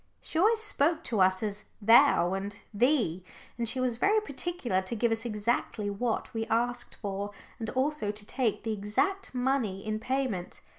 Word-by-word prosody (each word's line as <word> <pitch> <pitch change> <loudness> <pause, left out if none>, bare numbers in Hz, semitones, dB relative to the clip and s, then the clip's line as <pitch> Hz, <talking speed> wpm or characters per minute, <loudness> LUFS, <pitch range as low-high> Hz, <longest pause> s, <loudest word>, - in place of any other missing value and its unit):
She 320 - -2
always 440 +5 +4
spoke 330 -4 +1
to 220 -5 0
us 185 +2 +3
as 210 0 -4
"thou" 225 -5 +6
and 200 +1 -4 0.2
"thee," 225 - +2 0.3
and 235 -1 -1
she 255 - -2
was 250 -2 0
very 415 - +4
particular 280 - -2
to 190 +5 -4
give 230 +1 +1
us 225 +1 -1
exactly 210 -1 -1
what 225 +3 -2
we 225 0 -2
asked 240 +2 -1
for, 200 -1 -4 0.3
and 225 -1 -3
also 265 -4 0
to 210 0 -5
take 240 -1 -1
the 225 -1 -1
exact 255 - -1
money 245 -7 0
in 215 0 -2
payment. 245 -7 -2
230 Hz, 170 wpm, -29 LUFS, 205-265 Hz, 0.3 s, thou